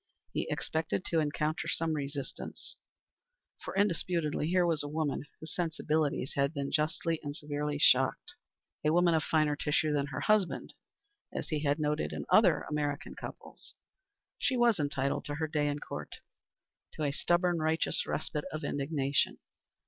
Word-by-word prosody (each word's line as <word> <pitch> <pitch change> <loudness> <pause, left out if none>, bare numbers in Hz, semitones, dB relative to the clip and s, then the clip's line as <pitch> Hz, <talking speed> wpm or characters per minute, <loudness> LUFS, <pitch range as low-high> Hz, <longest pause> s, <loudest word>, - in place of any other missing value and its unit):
He - - -1
expected 160 +3 -1
to 165 - +2
encounter 155 +1 -1
some 165 -1 0
resistance, 140 -1 -5 0.9
for - - -6
indisputably 170 -6 +1
here 180 +1 +3
was 165 -3 +2
a 145 - -4
woman 150 -1 -1
whose 155 - -8
sensibilities 155 -4 0
had 140 +2 +1
been 140 -1 -2
justly 160 +1 0
and 145 -1 -5
severely 150 -1 -2
shocked 135 - +4 0.5
a 150 - +3
woman 175 +1 +4
of 160 -1 +2
finer 155 -2 +2
tissue 150 +1 +1
than 140 -1 +1
her 145 - -4
husband, 215 -4 +1 0.6
as - - -4
he 155 - 0
had 145 0 +1
noted 150 0 0
in - - -4
other 190 -7 +6
American 145 0 -2
couples. - - -10 0.6
She 260 - +1
was 235 -5 +4
entitled 140 -1 0
to 145 - -3
her 160 +1 -1
day 150 -1 +1
in 145 0 0
court - - -6 0.8
to 155 - -4
a 145 - +1
stubborn, 175 +3 +2
righteous 160 +1 +1
respite 150 0 -2
of 155 +1 -4
indignation. 140 -1 0
155 Hz, 155 wpm, -31 LUFS, 145-165 Hz, 0.9 s, other